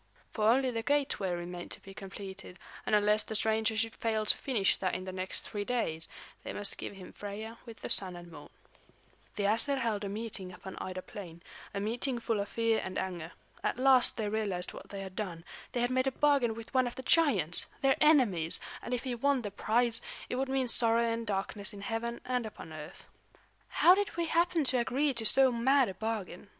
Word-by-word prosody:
For 215 -1 +2
only 260 +2 +3
the 230 -1 -2
gateway 275 -7 0
remained 175 0 -5
to - - -8
be 195 - -12
completed, 195 -1 -9 0.3
and - - +4
unless 210 +1 +4
the 220 - -5
stranger 220 0 +1
should 225 0 0
fail 220 -1 -1
to - - +4
finish 225 -8 +1
that 185 - -1
in 185 - -4
the 185 - -5
next 185 0 -4
three 205 -1 -4
days, 200 -9 -1 0.4
they - - -5
must 205 -1 -3
give - - -6
him 185 -2 -11
Freia 215 +3 -7
with 230 -1 -11
the - - -4
Sun 185 -2 0
and 175 0 -11
Moon. 145 -2 -11 0.9
The 205 - -2
Æsir 230 +7 +2
held 225 -5 -1
a 200 - -3
meeting 200 -3 -5
upon 190 +1 -9
Ida 185 0 -5
Plain, 170 -4 -10 0.3
a 200 - -3
meeting 240 +5 -1
full 230 -2 -1
of 200 0 -3
fear 230 -1 +1
and 185 - -5
anger. 175 -3 -4 0.3
At - - 0
last 260 -1 +5
they 220 -2 -1
realized 205 -4 -2
what - - -11
they 200 -1 -6
had 190 -1 -8
done; 175 -6 -4 0.3
they 245 - -1
had 245 +1 +1
made 255 +1 +2
a - - +2
bargain 275 -5 +2
with 230 +1 -10
one 255 -1 +3
of 240 - -6
the 260 - -7
giants, 205 - +3
their 270 -1 +4
enemies; 235 - +4 0.2
and 250 - -2
if 245 - -5
he 255 -2 -2
won 265 +1 +1
the 205 - -4
prize, 230 +3 +1 0.3
it - - -2
would 265 +1 -1
mean 265 -1 +1
sorrow 230 0 +7
and 230 0 -2
darkness 200 +1 -1
in 200 - -9
heaven 235 +2 -3
and 250 -2 -1
upon 165 -6 -10
earth. 155 -1 -10 0.6
"How 355 - +6
did 400 -3 -1
we 340 - +1
happen 335 0 +2
to 255 -2 +5
agree 270 +4 +1
to 225 -3 +4
so 265 +2 +5
mad 260 +2 +3
a - - -5
bargain?" 210 -3 -4
220 Hz, 215 wpm, -31 LUFS, 195-250 Hz, 0.9 s, sorrow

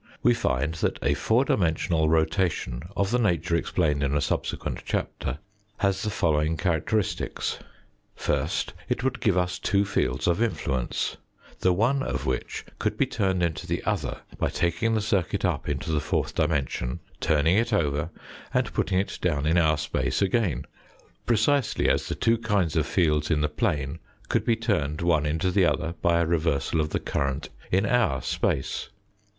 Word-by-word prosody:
We 120 - +6
find 75 - 0
that 80 - -1
a - - +3
four 120 +5 +2
dimensional 80 -5 +1
rotation 80 -6 +1 0.2
of 100 +1 +1
the 125 - +2
nature 85 -7 +1
explained 80 -3 +1
in 70 0 +1
a - - +2
subsequent 70 - -2
chapter, 65 - -3 0.4
has 95 -1 +1
the 105 - -1
following 80 -4 +1
characteristics: 90 +5 -1 0.6
First, - - -1 0.2
it - - -1
would 130 0 0
give 100 -4 +2
us 90 0 0
two 100 0 +2
fields 65 -8 0
of 85 +5 +2
influence, 65 - -1 0.4
the 90 - +3
one 120 +9 +2
of 65 - -2
which 65 -1 -3
could - - -1
be - - +3
turned 95 -4 0
into 85 -3 -2
the - - -2
other - - -2 0.2
by - - +1
taking 85 +7 0
the 110 - +1
circuit 100 -5 0
up - - -1
into - - -2
the 75 - +2
fourth 75 - -1
dimension, 70 -5 -1 0.2
turning 80 +3 +3
it 115 +3 +2
over, 75 -6 +1 0.5
and - - +1
putting 95 - 0
it 95 - -1
down 75 -5 0
in 80 +3 +4
our 80 -2 +3
space 75 - -1
again, 100 -3 +1 0.6
precisely 120 +3 +2
as - - +2
the - - -2
two 115 0 +2
kinds 100 -8 0
of 80 -3 +1
fields 75 -5 +2
in 75 -3 +2
the 75 - +2
plane 75 -2 -1 0.3
could - - +1
be 115 - +3
turned 85 -10 -1
one 80 -3 +2
into 80 +5 0
the 95 -1 +4
other 80 0 0
by 85 -1 +3
a 85 - +2
reversal 80 -2 +1
of 75 - -1
the - - -1
current 70 -1 -2 0.2
in 95 +3 +3
our 105 - +2
space. 65 - -1
85 Hz, 170 wpm, -26 LUFS, 75-100 Hz, 0.6 s, We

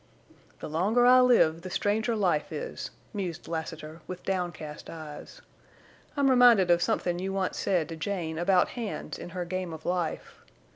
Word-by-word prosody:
"The - - -5
longer 200 +10 +2
I 255 +1 +8
live 170 -10 +4
the 185 - -7
stranger 215 +5 0
life 180 -8 0
is," - - -5 0.2
mused 180 -5 -4
Lassiter, 160 -1 -6
with 185 -1 -7
downcast 175 -5 -4
eyes. 155 - -9 0.7
"I'm 280 -1 +3
reminded 240 -8 +6
of 175 0 +4
somethin' 175 0 0
you 190 +1 -3
once 195 -1 -2
said 180 -6 +1
to 165 - -5
Jane 160 -2 -3
about 180 +1 +3
hands 230 -4 -5
in - - -7
her 175 - -2
game 185 0 -3
of 160 - -10
life. 175 -3 -3
180 Hz, 160 wpm, -28 LUFS, 165-205 Hz, 0.7 s, I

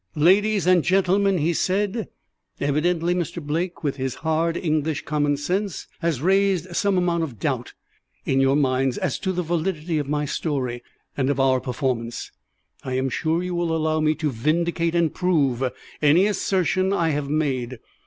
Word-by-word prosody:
"Ladies 200 +6 +3
and 180 -2 +4
gentlemen," 195 +1 +2
he 165 +2 +1
said, 200 +5 0 0.5
"evidently 165 +4 +1
Mr. 175 -1 -3
Blake, 165 +4 -3
with 145 -2 -1
his 130 -1 -3
hard 165 +1 +1
English 155 -2 -1
common 145 -1 +1
sense, 190 +7 -2
has 160 -5 -1
raised 190 -1 +2
some 200 0 +2
amount 175 -2 +1
of 140 -8 -4
doubt - - -2 0.5
in 135 - +1
your 135 +1 +3
minds 130 -2 +1
as - - -2
to 190 - -1
the 180 -1 -2
validity 165 -1 -1
of 145 -1 -4
my 150 0 0
story 135 -5 -2 0.3
and 135 -1 0
of 140 -1 0
our 130 -1 +3
performance. 125 -3 -3 0.5
I 130 - -4
am 130 +1 0
sure 160 +6 0
you 180 0 -3
will 170 -2 0
allow 155 0 0
me 155 0 +2
to 155 -2 -1
vindicate 165 +6 0
and 170 -3 +2
prove 145 -9 +1 0.4
any 155 +6 +5
assertion 190 -2 +1
I 170 -4 +1
have 145 -2 -2
made. 130 -5 -1
160 Hz, 165 wpm, -23 LUFS, 140-180 Hz, 0.5 s, any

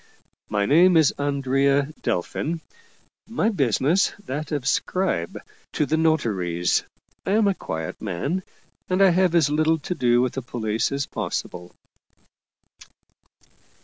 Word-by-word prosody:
My 100 -1 +1
name 170 - +5
is 155 -3 +4
Andrea 140 +1 +1
Delfin, 140 - -2 0.7
my 225 -1 +1
business 145 - +2
that 150 +2 -5
of 145 -4 -2
scribe 160 - 0
to - - -7
38 - - -11
Paul - - -40 0.4
Heyse - - -14
the 160 - +2
notaries. 100 - +1 0.4
I - - +1
am 215 -1 +3
a 200 - +3
quiet 80 - -6
man, 110 - -2 0.5
and 185 +1 +1
have 185 -2 +4
as 155 -4 +3
little 155 +2 +2
to 160 +4 -4
do 120 -6 +2
with 125 0 +1
the 135 - -3
police 110 -2 -2
as 140 0 -1
possible." 90 0 -5
140 Hz, 140 wpm, -23 LUFS, 120-170 Hz, 0.7 s, name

